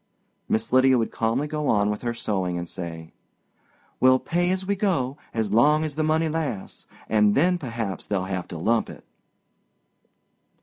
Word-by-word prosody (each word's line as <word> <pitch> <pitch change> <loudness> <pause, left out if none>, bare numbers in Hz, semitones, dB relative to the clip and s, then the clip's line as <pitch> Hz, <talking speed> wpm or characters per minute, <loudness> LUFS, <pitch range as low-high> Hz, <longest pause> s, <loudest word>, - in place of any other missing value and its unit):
Miss 110 +2 -1
Lydia 130 0 +5
would 115 - -1
calmly 115 +5 0
go 150 -1 -3
on 105 0 +2
with 105 - -4
her 120 -1 -2
sewing 95 -6 -2
and 85 0 -4
say, 80 -3 -7 0.9
"We'll 130 0 +6
pay 175 +6 0
as 190 0 -1
we 200 +1 0
go 165 - 0
as 110 -3 -2
long 150 +7 +4
as 155 -2 -3
the 155 - -2
money 160 +1 +2
lasts, 150 -10 -4 0.2
and 105 -1 +3
then 180 +5 +3
perhaps 115 - -4
they'll 95 -3 -1
have 95 -1 -4
to 85 - -7
lump 110 +7 +1
it." - - -12
120 Hz, 170 wpm, -24 LUFS, 105-155 Hz, 0.9 s, We'll